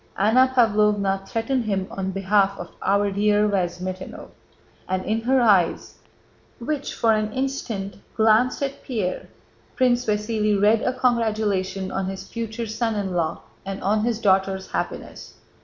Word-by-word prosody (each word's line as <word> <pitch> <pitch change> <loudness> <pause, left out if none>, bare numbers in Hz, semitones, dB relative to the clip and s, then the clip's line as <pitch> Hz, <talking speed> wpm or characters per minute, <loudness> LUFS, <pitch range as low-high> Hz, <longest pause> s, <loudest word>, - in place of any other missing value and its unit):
Anna 230 +6 +4
Pávlovna 205 -4 +2
threatened 230 +2 -1
him 195 -3 -1
on 190 -1 -3
behalf 195 +1 +1
of 175 - -8
"our 200 +1 +2
dear 210 +1 +2
Vyazmítinov," 185 -1 -3 0.6
and 185 0 -1
in 220 +1 0
her 260 +3 +2
eyes, 200 -8 +2 0.6
which, 285 +4 -3
for 225 -1 +3
an 215 0 0
instant, 245 -7 -3 0.2
glanced 225 +5 +3
at 275 0 -4
Pierre, 210 -8 -3 0.5
Prince 250 -1 +2
Vasíli 210 -1 +1
read 210 +2 +4
a - - +1
congratulation 210 -6 0
on 190 -1 -2
his 190 0 -6
future 230 0 -4
son 225 +1 -2
in 195 -3 -2
law 170 -3 -1 0.2
and 195 0 -5
on 210 +2 +1
his 235 -1 0
daughter's 190 -2 +1
happiness. - - -5
210 Hz, 140 wpm, -23 LUFS, 195-230 Hz, 0.6 s, Anna